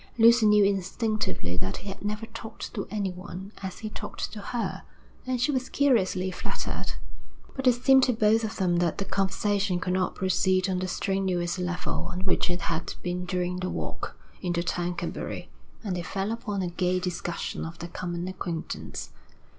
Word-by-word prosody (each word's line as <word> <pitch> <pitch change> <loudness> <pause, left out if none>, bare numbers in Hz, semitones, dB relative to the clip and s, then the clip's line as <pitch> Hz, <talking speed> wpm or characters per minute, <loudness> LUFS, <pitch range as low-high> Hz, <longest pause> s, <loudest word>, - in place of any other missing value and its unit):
Lucy 230 -1 +8
knew 210 0 +7
instinctively 195 - 0
that 95 +1 -1
he 200 - -9
had 195 - -7
never 210 +2 -1
talked 220 0 -7
to 200 - -3
anyone 190 -1 -4
as 190 -1 -4
he 215 - -4
talked - - -4
to 210 - -5
her, 235 +3 -2 0.5
and 255 -1 +1
she 255 +5 +3
was 260 -2 -1
curiously 190 -9 +3
flattered. - - -3 0.6
But 265 -1 0
it 250 - +8
seemed 265 +2 +6
to 250 - +3
both 220 +1 +4
of 220 0 -2
them 180 -3 +3
that 170 -2 +2
the 195 - -1
conversation 195 -1 +1
could 180 +1 0
not 185 -1 +1
proceed 185 0 +3
on 185 -1 +1
the 185 - -1
strenuous 185 -2 0
level 180 -1 -1
on 180 +1 -3
which 185 -1 +2
it 175 0 0
had 165 0 -1
been 180 0 -1
during 180 0 0
the 185 0 -1
walk - - -4 0.2
into 175 -2 0
Tercanbury, 175 0 -2 0.3
and 195 -4 -1
they 175 - -1
fell 195 +4 -2
upon 210 -4 -2
a 175 - 0
gay 180 +1 +1
discussion 175 -1 -2
of 165 0 -5
their 170 - -6
common 175 0 -3
acquaintance. 175 -3 -4
185 Hz, 180 wpm, -28 LUFS, 180-210 Hz, 0.6 s, Lucy